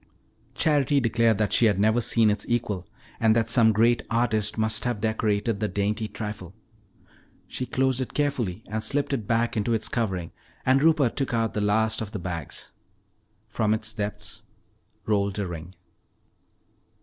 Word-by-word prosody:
Charity 145 -3 +3
declared 115 -2 +2
that 105 -1 0
she 115 - +5
had 100 -3 +1
never 110 +3 +3
seen 110 -1 +4
its 105 0 -2
equal 105 -6 -1 0.3
and 110 -1 +4
that 115 0 +1
some 115 -2 +5
great 115 +3 +3
artist 110 -3 +1
must 110 0 0
have 120 -4 -1
decorated 110 0 0
the 105 - 0
dainty 105 +3 -1
trifle. 105 -4 -7 0.9
She 130 - -5
closed 130 0 +1
it 130 - -5
carefully 120 -9 -1
and 110 +1 -3
slipped 140 +5 0
it 115 -7 -3
back 115 +1 +1
into 115 +2 +1
its 110 -1 -2
covering, 95 -9 -2 0.3
and 130 +1 +4
Rupert 155 -6 +3
took 135 -3 -1
out 115 -1 0
the 105 - -1
last 110 +2 +1
of 105 -2 -6
the - - -2
bags. 85 -5 -6 0.8
From 110 0 +1
its 110 0 -2
depths 105 -2 -5 0.6
rolled 100 -2 0
a 100 - -1
ring. 85 +1 -8
110 Hz, 160 wpm, -25 LUFS, 105-120 Hz, 0.9 s, she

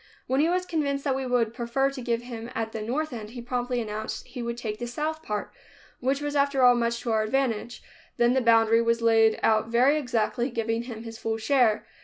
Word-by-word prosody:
When 265 +1 0
he 315 +3 +3
was 365 +1 0
convinced 280 -5 -1
that 270 -2 0
we 265 -1 -3
would 235 -3 +1
prefer 250 +3 0
to 270 -2 -7
give 235 -1 -1
him 235 -1 -7
at 225 0 -2
the 220 - -5
north 275 +7 -2
end, 215 -3 -6
he 240 +2 -8
promptly 245 0 -2
announced 215 -1 -4
that - - -22
he 250 - -6
would 235 0 -3
take 215 -3 -4
the 240 - -4
south 310 +5 -3
part, 210 -8 -4 0.5
which 270 +3 0
was 290 0 -3
after 280 -2 +2
all 245 0 +8
much 235 -1 -1
to 235 - -2
our 220 -1 +2
advantage. 230 0 -1 0.3
Then 240 +1 +4
the 265 - +2
boundary 230 -1 +4
was 230 0 +1
laid 225 -1 +4
out 220 0 +3
very 255 +6 +3
exactly, 240 -1 -1
giving 230 -1 -2
him 230 -3 -7
his 225 -1 -9
full 225 0 -2
share. 225 -1 +2
240 Hz, 230 wpm, -26 LUFS, 225-265 Hz, 0.5 s, all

